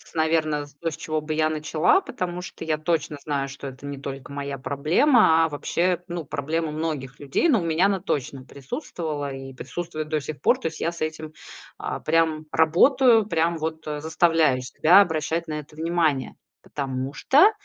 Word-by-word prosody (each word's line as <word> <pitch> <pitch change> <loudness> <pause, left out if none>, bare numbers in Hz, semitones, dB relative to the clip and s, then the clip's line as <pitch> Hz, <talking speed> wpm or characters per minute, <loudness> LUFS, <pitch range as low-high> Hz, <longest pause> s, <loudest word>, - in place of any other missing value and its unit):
наверно, 155 -2 +1 0.2
то, 165 - 0
с 155 - -8
чего 155 -1 -2
бы 155 0 -3
я 155 0 +2
начала. 155 - +2
Потому 180 - -4
что 170 - -8
я 155 -1 0
точно 155 -2 -1
знаю, 140 -2 -1
что 140 0 -8
это 135 +1 -10
не 140 -1 -6
только 135 0 -7
моя 140 -1 -4
проблема, 160 - +4
а - - -2
вообще, 175 +4 0
ну, 170 -3 -5
проблема 155 +3 -2
многих 150 -4 -4
людей. 145 - +1
Но 255 -10 +4
у - - -4
меня 165 +3 +2
она 200 -1 +2
точно 135 -4 -3
присутствовала 150 - -5
и 135 0 -8
присутствует 155 +4 -5
до 155 -1 +1
сих 150 +1 -7
пор. - - +4
То - - -2
есть 160 - -11
я 170 - 0
с 170 - -11
этим, 155 0 -4 0.5
а, - - -4
прям 160 -1 +1
работаю, 225 - +4
прям 170 -2 +1
вот, 160 0 -4
э, 150 -1 -4
заставляю 160 -4 +2
себя 160 +9 +5
обращать 165 -2 -1
на 155 -1 -3
это 150 0 -12
внимание. 160 -4 0 0.3
Потому 135 -1 -4
что 310 - +5
155 Hz, 185 wpm, -24 LUFS, 145-170 Hz, 0.5 s, себя